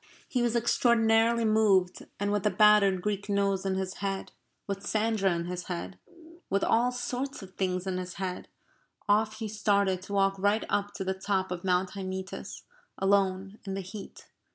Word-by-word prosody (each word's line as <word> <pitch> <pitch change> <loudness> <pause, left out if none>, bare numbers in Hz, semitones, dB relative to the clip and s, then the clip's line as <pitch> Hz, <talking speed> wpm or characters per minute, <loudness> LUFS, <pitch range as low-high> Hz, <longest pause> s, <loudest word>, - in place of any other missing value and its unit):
He 250 - 0
was 240 -1 +1
extraordinarily 230 -1 +3
moved, 210 -4 +2
and 205 0 0
with 205 -1 +1
the 210 - +2
battered 200 -2 +5
Greek 205 -1 -2
nose 200 -1 +1
in 190 - 0
his 190 0 -3
head, 195 -1 -3 0.3
with 200 0 -4
Sandra 215 -1 +1
in 170 0 -3
his 180 0 -5
head, 180 +1 -5 0.5
with 195 +1 +1
all 240 +2 +3
sorts 250 0 -4
of 190 -1 -12
things 185 -1 -1
in 185 -1 -2
his 180 0 -6
head, 185 -2 -4 0.6
off 215 +1 +2
he 220 0 -4
started 200 -3 +1
to 195 +2 -8
walk 195 -1 +2
right 205 +3 +2
up 205 0 -1
to 195 - -3
the 190 0 -1
top 190 -1 -1
of 175 -1 -4
Mount 185 0 +1
Hymettus, 190 -1 -6 0.3
alone, 195 +1 +1
in 195 -1 -4
the 195 - -3
heat. 195 +3 -10
195 Hz, 175 wpm, -29 LUFS, 190-215 Hz, 0.6 s, battered